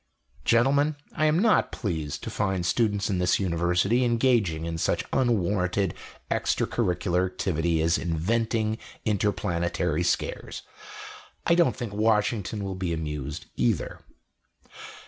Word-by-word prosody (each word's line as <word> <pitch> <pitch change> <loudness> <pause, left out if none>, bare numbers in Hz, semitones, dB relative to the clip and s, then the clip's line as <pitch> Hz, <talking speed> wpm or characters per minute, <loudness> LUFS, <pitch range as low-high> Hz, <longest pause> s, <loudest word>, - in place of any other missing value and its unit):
"Gentlemen, 140 +6 +3 0.2
I 155 - +2
am 155 +1 +3
not 215 +3 +3
pleased 75 - -4
to - - -5
find 95 -4 -1
students 100 +2 +1
of 95 - 0
this 90 -1 +2
University 90 +6 +1
engaging 115 -9 +2
in 85 0 -3
such - - 0
unwanted 100 -6 +1 0.4
extra - - +1
curricular 90 0 0
activity 85 -3 0
as 85 +1 +2
inventing 110 +6 0 0.3
interplanetary 90 -5 0
scares. 90 - -2 0.8
I - - +4
don't 170 -1 +3
think 120 -5 -5
Washington 105 -1 +1
will 95 -1 -3
be 90 -2 -2
amused, 75 -3 -4
either." - - 0
95 Hz, 120 wpm, -26 LUFS, 85-115 Hz, 0.8 s, I